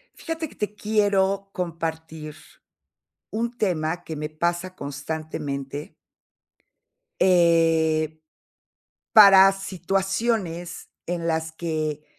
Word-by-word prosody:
Fíjate 325 -1 -5
que - - -17
te 210 -1 -3
quiero 200 -2 +1
compartir 160 -3 -5 1.0
un 235 +2 -3
tema 170 -5 -1
que 160 - -6
me 150 +1 -4
pasa 175 +3 -2
constantemente. 145 -1 -5 1.3
Eh. 165 -3 +3 1.0
Para 195 -3 +9
situaciones 195 -1 -2 0.2
en 170 -1 -3
las 160 -1 -1
que 155 -2 -3
170 Hz, 85 wpm, -24 LUFS, 155-195 Hz, 1.3 s, Para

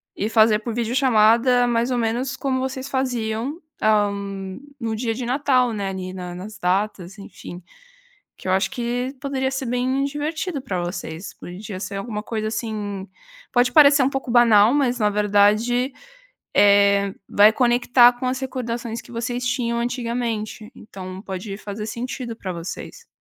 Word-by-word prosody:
e 210 - -2
fazer 220 -1 +4
por 225 +1 -5
videochamada 240 0 +3
mais 235 0 +1
ou 250 - +1
menos 245 +3 -1
como 265 -1 -1
vocês 260 +1 -4
faziam, 255 +1 -2 0.2
hã, 210 -1 +3 0.7
no 225 -2 -2
dia 225 0 -1
de 250 +1 -4
Natal, 255 -2 +2
né, 200 -2 -3
ali 185 -1 -5
na 180 -1 -6
nas 205 +4 -9
datas, 190 0 -1
enfim. 180 -2 -10 0.7
Que - - -12
eu - - +2
acho 195 +1 +1
que 245 +1 -3
poderia 265 -1 -1
ser 265 -1 -3
bem 255 +3 0
divertido 295 +1 -3
para 185 -6 -3
vocês, 175 0 -6
podia 185 +2 -8
ser 200 0 -5
alguma 210 +1 -4
coisa 215 -1 -3
assim 210 -3 -4 0.5
pode 245 0 +3
parecer 285 -2 +7
um - - +3
pouco 270 -2 -4
banal, 230 -2 +6
mas 250 -4 +1
na 210 -1 +3
verdade, 210 +5 +2 0.6
eh, 200 -1 +5 0.2
vai 210 +2 +6
conectar 245 0 +5
com 245 +1 -5
as 255 +1 -1
recordações 240 -3 -4
que - - -16
vocês 245 +1 -3
tinham 235 -1 0
antigamente, 235 -3 -3
então 190 -3 -9
pode 195 +1 -6
fazer 210 +1 -6
sentido 235 +1 -5
para 190 -4 -5
vocês. 175 - -8
230 Hz, 155 wpm, -22 LUFS, 205-250 Hz, 0.7 s, parecer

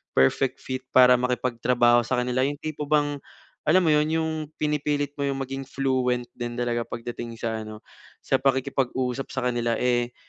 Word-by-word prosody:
perfect 65 - +3
fit 130 0 -5
para 125 -1 +7
makipagtrabaho 120 -1 +2
sakanila. 125 +1 0
Yung 145 +1 -3
tipo 150 -2 -4
bang, 145 -1 +1 0.5
alam 185 +4 +5
mo 160 - +3
yun 150 0 +3
yung 160 0 -1 0.2
pinipilit 150 -1 -1
mo 140 - 0
yung 135 -1 -2
maging 135 0 -5
fluent 130 -3 0
din 120 -1 -5
talaga 120 -1 -1
pagdating 120 0 -6
sa 110 -1 -3
ano 110 0 -9 0.4
sa - - +2
pakikipag-usap 130 -1 0
sakanila, 120 -2 -1
eh, 120 -1 0
130 Hz, 150 wpm, -25 LUFS, 120-140 Hz, 0.5 s, para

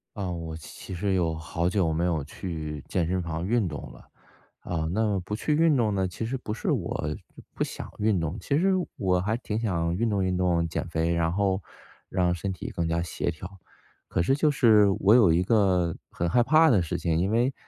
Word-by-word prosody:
呃， 95 -3 -3
我 85 -2 -5
其 80 +4 -9
实 95 +2 0
有 85 -3 +1
好 85 +2 -2
久 90 -4 +1
没 85 - 0
有 85 -4 0
去 75 -2 -6
健 85 -3 0
身 90 +1 0
房 85 0 -4
运 110 -1 +1
动 75 -2 -7
了。 - - -15 0.6
啊， 80 -3 -3
那 110 +4 +1
么 100 -2 0
不 100 - -7
去 150 +8 0
运 160 -2 +4
动 110 -4 +1
呢， 95 -1 +1
其 90 +5 -5
实 120 +4 -3
不 110 -4 -5
是 115 - -2
我 - - -1 0.4
不 - - -12
不 - - 0
想 - - -6
运 105 -3 +2
动。 80 +4 -3
其 140 +9 0
实 190 +4 +3 0.2
我 90 -2 +1
还 105 +5 0
挺 110 -3 -4
想 85 -7 -1
运 115 +4 0
动 100 -3 0
运 90 0 0
动、 85 -2 +1
减 85 - -3
肥， 85 0 0
然 85 -1 +1
后 95 +1 0 0.5
让 90 -2 +1
身 95 +3 -3
体 90 - -6
更 85 - -2
加 85 +1 0
协 85 - -2
调。 95 +4 -10 0.5
可 - - 0
是 135 +11 +2
就 150 +1 +2
是 110 -7 +5
我 105 +4 +5
有 110 -9 +6
一 85 +2 +3
个 95 -5 +2 0.2
很 85 - -2
害 120 +7 +4
怕 155 +6 +5
的 110 -9 +4
事 85 - -2
情。 80 -2 0
因 95 +4 +1
为 120 +4 +2
95 Hz, 240 characters per minute, -26 LUFS, 85-105 Hz, 0.6 s, 有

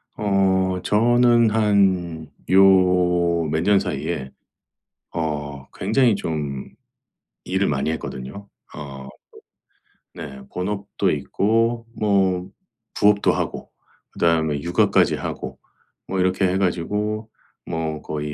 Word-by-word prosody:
어 95 -2 +1
저는 120 +1 +4
한 95 -7 +1 0.2
요 90 -3 +4
몇 80 +1 0
년 100 +1 +4
사이에 70 -3 -3 0.8
어 75 -4 -4
굉장히 115 +4 +2
좀 75 -8 -4 0.8
일을 95 +2 0
많이 75 +2 0
했거든요. 80 +5 -6 0.3
어. 70 -2 -8 1.1
네 70 -5 -8
본업도 100 +2 -2
있고 115 +3 0
뭐 95 -3 +1 0.5
부업도 105 0 +3
하고 - - -4 0.4
그다음에 80 -3 +1
육아까지 85 +3 +2
하고 - - -6 0.5
뭐 95 - -2
이렇게 95 +1 +2
해 90 +1 0
가지고 105 +4 -1 0.4
뭐 80 -2 -3
거의 75 -1 -4
90 Hz, 185 characters per minute, -22 LUFS, 80-100 Hz, 1.1 s, 저는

